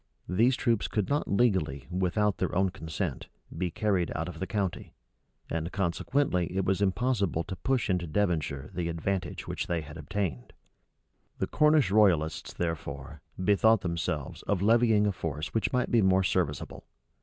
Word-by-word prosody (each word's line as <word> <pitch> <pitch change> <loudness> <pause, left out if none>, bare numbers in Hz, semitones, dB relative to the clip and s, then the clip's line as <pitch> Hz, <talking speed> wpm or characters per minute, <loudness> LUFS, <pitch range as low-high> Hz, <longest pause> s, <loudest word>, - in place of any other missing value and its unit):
These 115 +9 +3
troops 115 -5 +1
could 105 -3 -1
not 145 +1 0
legally, 95 - +1
without 95 +3 +1
their - - -1
own 95 +1 +2
consent, 80 -4 -4 0.3
be 90 +2 -1
carried 95 0 0
out 80 +1 -2
of 85 -2 -8
the 95 - -3
county; 95 -1 -3 0.5
and 80 +1 -3
consequently 95 - 0
it 95 - +1
was 95 +1 +1
impossible 100 -4 +1
to 95 - -6
push 125 +6 0
into 90 -3 0
Devonshire 80 -6 -1
the 85 -2 -2
advantage 90 +2 -3
which - - -3
they 85 -2 -1
had 75 +1 -10
obtained. 80 -5 -3 0.8
The - - 0
Cornish 150 -8 +3
royalists, 90 -7 +3
therefore, 75 -4 -5 0.2
bethought 105 +3 +4
themselves 85 -5 -3
of 100 -2 +1
levying 110 -1 +4
a 105 - +2
force 80 -3 -4
which 110 - 0
might 125 -1 0
be 115 - +5
more 95 -1 +4
serviceable. 90 - -2
95 Hz, 155 wpm, -29 LUFS, 80-105 Hz, 0.8 s, be